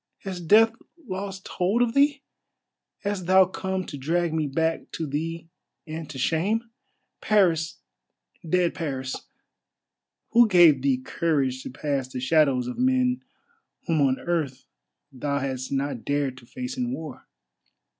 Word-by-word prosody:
_ - - -29
Has 185 -2 -5
Death 220 +7 +6 0.4
lost 190 0 -5
hold 200 +7 +1
of 230 -1 -1
thee? 280 0 +3 0.8
Hast 200 -3 -3
thou 190 0 +7
come 190 0 -3
to 145 - -7
drag 165 +4 0
me 155 -2 0
back 160 +4 -1
to 160 - -3
thee 165 +3 -4 0.4
and 160 -1 -6
to 145 - -7
shame? 200 - 0 0.5
Paris, 175 -7 +2 0.7
dead 175 +1 +1
Paris! 130 -5 -3 1.2
Who 235 0 +6
gave 170 -8 +6
thee 135 -1 +2
courage 135 -1 -1
to - - -7
pass 135 0 -2
the 130 -1 -6
shadows 135 -2 +3
of 125 - -5
men 255 0 +2 0.6
whom 160 -3 +1
on 135 -1 +2
earth 155 -7 -2 0.5
thou 140 +2 -2
hadst 130 -2 -3
not 140 -3 -2
dared 140 -2 -1
to 120 - -19
face 125 0 -6
in 125 -1 -1
war?" 145 0 -7
160 Hz, 145 wpm, -25 LUFS, 135-190 Hz, 1.2 s, thou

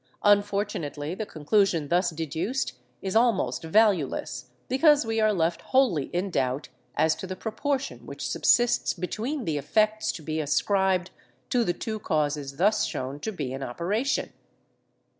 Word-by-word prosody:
Unfortunately, 200 -7 +1
the 210 +2 -4
conclusion 165 -1 +1
thus 180 +1 +3
deduced 165 - -2 0.3
is 190 +1 -3
almost 220 - +2
valueless, 175 - +1 0.2
because 290 +1 +4
we 225 0 -1
are 215 0 +4
left 170 -3 0
wholly 240 - +2
in 185 +2 -3
doubt 130 -1 -1 0.3
as 155 +1 +3
to 190 - -7
the 185 - -4
proportion 265 +7 -3
which - - -5
subsists 240 0 +3
between 225 - -3
the 150 -2 -1
effects 215 +8 +1
to 160 - -8
be 155 +1 -2
ascribed 185 +4 +1 0.4
to 245 -1 +3
the 175 - 0
two 215 +4 -4
causes 145 -6 -1
thus 210 +5 +3
shown 130 +3 -4
to 220 - -3
be 145 -10 -4
in 135 - -5
operation. 195 - -1
185 Hz, 145 wpm, -26 LUFS, 155-220 Hz, 0.4 s, because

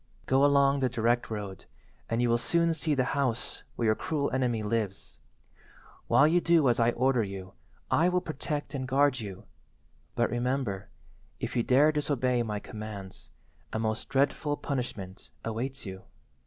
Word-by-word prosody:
"Go 135 +1 +3
along 140 -1 +4
the 130 -1 +1
direct 120 0 +1
road, 100 -3 -6 0.4
and 115 +1 +1
you 120 - +2
will 120 - +3
soon 170 +6 +2
see 160 -2 0
the 130 - +2
house 130 -4 -1
where 120 - -1
your 110 - +5
cruel 140 +5 -2
enemy 125 -4 0
lives. 105 -2 -2 0.9
While 145 - +6
you 175 +3 +3
do 165 -5 +4
as 120 - +2
I 115 0 +4
order 130 0 +2
you 95 -2 -6 0.4
I 170 +3 +4
will 180 0 +2
protect 150 -2 -4
and 130 -2 -3
guard 140 0 +3
you, 100 -4 -7 0.7
but, 120 - +1
remember, 120 -5 -1 0.5
if - - -4
you 120 - +3
dare 135 +6 +5
disobey 130 -5 +1
my 105 -3 -2
commands, 105 -3 -8 0.4
a - - -2
most 110 0 -2
dreadful 145 +2 +1
punishment 105 -8 -5 0.2
awaits 125 +5 -3
you." 95 -1 -7
125 Hz, 160 wpm, -29 LUFS, 110-140 Hz, 0.9 s, While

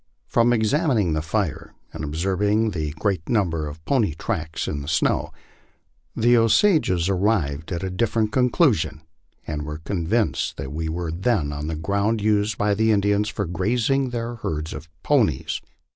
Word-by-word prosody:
From 120 0 +3
ex 110 -3 +2
amining 125 - +2
the 80 - 0
fire 85 +2 -3 0.2
and - - -6
observing 95 +8 0
the 80 -5 -2
great 95 -6 -1
number 85 -9 +1
of 80 +2 -10
pony 110 - +1
tracks 80 0 -3
in 70 - -3
the 70 - -8
saow, 75 0 +1 0.9
the 120 +2 +4
Osages 115 - +3
arrived 90 -7 0
at 85 0 -3
a 95 - -2
different 110 +2 0
conclusion, 120 - +2 0.4
and 75 -1 -3
were 75 +1 -5
convinced 95 +6 -1
that 65 +1 -6
we 80 +1 -3
weid 85 +1 -4
then 95 -11 +1
on 75 +1 -4
the 80 - -2
ground 100 +7 0
used 105 0 +1
by 105 0 +2
the 110 +2 +2
Indians 105 0 +2
for 100 - -3
grazing 120 +10 0
their 120 0 -4
herds 80 -6 -4
of 75 +1 -9
ponies. - - +1
100 Hz, 160 wpm, -23 LUFS, 80-110 Hz, 0.9 s, the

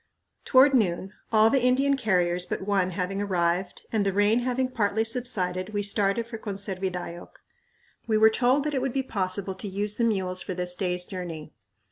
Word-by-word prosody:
Toward 270 +1 +6
noon, 190 -4 +1 0.2
all 220 0 +5
the 270 - +3
Indian 270 +3 +3
carriers 180 -7 0
but - - -3
one 195 -2 +1
having 185 +2 -3
arrived, 180 -1 -1
and 220 -2 +1
the 195 - +1
rain 205 +4 +3
having 255 +1 0
partly 220 -3 0
subsided, 215 -5 -1
we 205 - 0
started 200 +2 +1
for 230 -1 -8
Conservidayoc. 190 -4 -5 0.7
We 220 -1 +2
were 220 +1 +6
told 255 +5 +2
that 300 0 -2
it 265 - 0
would 265 -2 -2
be 270 - 0
possible 195 -4 -2
to 190 +3 -6
use 205 +2 -2
the 235 - +1
mules 190 -5 0
for 185 - -5
this 180 0 -2
day's 180 -1 -2
journey. 165 -5 -7
200 Hz, 180 wpm, -26 LUFS, 185-230 Hz, 0.7 s, Toward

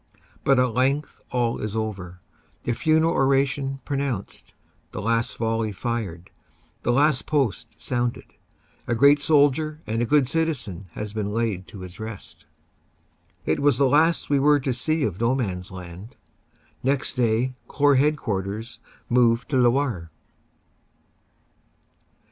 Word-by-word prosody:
But 135 -1 +4
at 125 -2 +2
length 135 +4 0
all 120 -2 0
is 105 0 -4
over; 95 -5 -4 0.4
the 120 - 0
funeral 160 +6 +2
oration 135 0 +1
pronounced, 135 -8 -4 0.4
the - - -4
last 115 +3 0
volley 115 -1 -1
fired, 100 -5 -4 0.5
the 120 - +1
Last 140 +1 +2
Post 140 -9 0
sounded; 120 -1 -2 0.6
a 120 - +1
great 140 +4 +6
soldier 150 +1 +2
and 115 +1 -1
good 145 -3 +4
citizen 130 - -2
has 105 -1 -5
been 105 -2 -2
laid 105 -4 -2
to 100 - -10
his 90 +1 -10
rest. 110 -2 -9 1.0
It - - +1
was 145 0 +3
the 140 - +4
last 160 +5 +3
we 140 -1 +2
were 145 +1 +4
to 130 -1 -1
see 155 +5 0
of 100 -1 -2
No 120 +3 +2
Man 100 -9 -2
s 90 - -11
Land. 90 +3 -10 0.7
Next 135 +1 0
day 120 +1 +1
Corps 145 -1 +3
Headquarters 115 -6 -1 0.3
move 120 0 +3
to 140 - -1
Lewarde. 120 - +1
120 Hz, 135 wpm, -24 LUFS, 110-140 Hz, 1.0 s, great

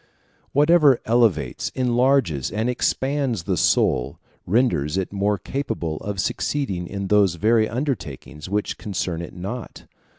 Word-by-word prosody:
Whatever 150 -2 +5
elevates, 115 -3 +1
enlarges, 125 - +2
and 110 +2 -2
expands 130 - -1
the - - -1
soul, - - +1 0.3
renders 95 - +1
it 95 +1 -2
more 100 +1 +1
capable 95 - -3
of 100 -2 -5
succeeding 95 -5 -2
in 100 +1 -4
those 100 -4 +4
very 110 +5 +2
undertakings 90 - -4
which 105 +1 -2
concern 90 -4 -3
it 85 - -8
not. 100 +7 -7
105 Hz, 125 wpm, -23 LUFS, 90-125 Hz, 0.3 s, Whatever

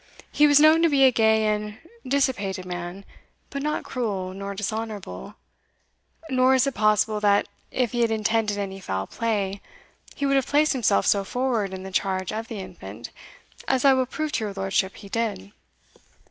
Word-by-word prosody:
He 295 - +5
was 290 0 +6
known 310 +2 +6
to 335 - +4
be 280 -2 +4
a 260 - +7
gay 220 -2 +3
and 210 0 -1 0.3
dissipated 210 -9 0
man, 180 +2 -6 0.5
but 280 - -4
not 300 +1 -2
cruel 200 -7 -3
nor 200 +1 -6
dishonourable; 210 - -5 0.9
nor 260 -2 +3
is 260 +1 +3
it 275 - -1
possible, 215 0 +2
that, 205 -1 +3 0.2
if 250 -3 -1
he 240 - -1
had 230 - +3
intended 220 -1 0
any 195 -1 -4
foul 95 - -3
play, 200 - -2 0.5
he 280 - -2
would 275 0 +3
have 270 -1 0
placed 300 +2 +3
himself 215 - +2
so 200 -1 +3
forward 235 -3 -1
in 190 0 -7
the 190 - -8
charge 185 0 -1
of 225 +1 -4
the 225 - -6
infant, 190 - -9 0.6
as 265 0 +1
I 275 - +7
will 260 -1 +1
prove 310 +3 -3
to 220 - -1
your 205 - -4
lordship 195 0 -1
he 200 - -11
did." 205 - -3
215 Hz, 180 wpm, -24 LUFS, 195-255 Hz, 0.9 s, a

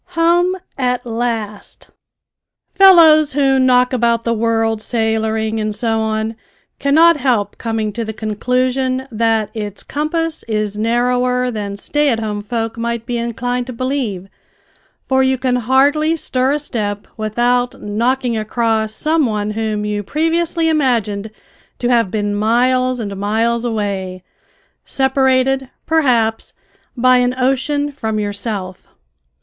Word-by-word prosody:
HOME 350 +2 +3 0.2
AT 250 -1 0
LAST! 225 -3 -4 0.8
Fellows 330 -6 +6
who 270 -1 +2
knock 250 0 +3
about 235 -2 +1
the 230 - 0
world 225 -1 0
sailoring 220 -1 -1
and 215 -1 -2
so 225 -1 -1
on, 220 0 -2 0.4
cannot 320 +4 +5
help 245 -7 0
coming 225 -2 -2
to 235 - -3
the 220 - -4
conclusion 255 +4 -1
that 225 -1 0
its 210 -2 -6
compass 315 +2 -2
is 215 -2 -1
narrower 250 +3 +1
than 205 -3 -5
stay 295 +7 0
at 230 -3 0
home 210 -2 -3
folk 225 +1 -4
might 235 0 -3
be 240 -1 -2
inclined 245 +2 -3
to 255 - -6
believe, 235 -7 -3 0.8
for 265 0 +2
you 265 0 +2
can 250 -1 0
hardly 285 +6 +2
stir 265 -3 0
a - - +1
step 210 -8 -4
without 240 +3 0
knocking 235 +4 -1
across 220 0 -1
some 310 -2 +1
one 210 -1 -2
whom 215 -1 -2
you 210 0 -2
previously 330 - 0
imagined 230 -9 0 0.5
to 245 - -1
have 235 -5 +2
been 205 0 -2
miles 250 +4 +1
and 200 -3 -4
miles 225 +4 0
away, 200 -5 -3 0.6
separated, 265 0 +1 0.2
perhaps, 245 -9 +1 0.4
by 255 +1 +4
an 250 0 +1
ocean 270 +3 0
from 220 -6 -3
yourself. 200 -2 -4
235 Hz, 130 wpm, -17 LUFS, 220-265 Hz, 0.8 s, Fellows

